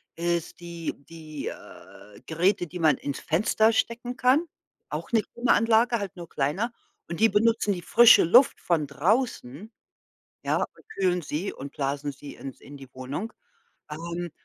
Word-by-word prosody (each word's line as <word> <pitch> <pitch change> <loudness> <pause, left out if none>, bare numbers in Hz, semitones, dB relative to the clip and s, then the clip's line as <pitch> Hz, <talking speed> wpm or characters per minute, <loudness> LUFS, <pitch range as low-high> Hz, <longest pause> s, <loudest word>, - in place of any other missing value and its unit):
ist 170 0 -2
die 170 -1 -5 0.2
die, 155 -3 -8
äh, 100 +2 -12
Geräte, 175 +3 +1
die 180 +3 -8
man 155 -4 +4
ins 140 - -5
Fenster 215 +6 +2
stecken 240 +2 -2
kann, 265 +7 +3 0.4
auch - - -5
'ne 225 -2 +4
Klimaanlage, 235 0 +2
halt 200 -3 -6
nur 170 -3 -9
kleiner. 185 - -1 0.4
Und 170 - -5
die 225 - +5
benutzen 215 0 +2
die 180 - -6
frische 235 0 +7
Luft 245 +11 +5
von 160 -4 0
draußen, 180 - -1 0.7
ja, - - +1
und - - -8
kühlen 180 -2 +1
sie 155 +6 -3
und 140 +1 -9
blasen 140 +1 -2
sie 140 +1 -11
ins 135 -2 -9
in 145 - -12
die 135 -2 -12
Wohnung. 140 - -5 0.6
Ähm, 170 +2 -5
175 Hz, 155 wpm, -26 LUFS, 150-220 Hz, 0.7 s, frische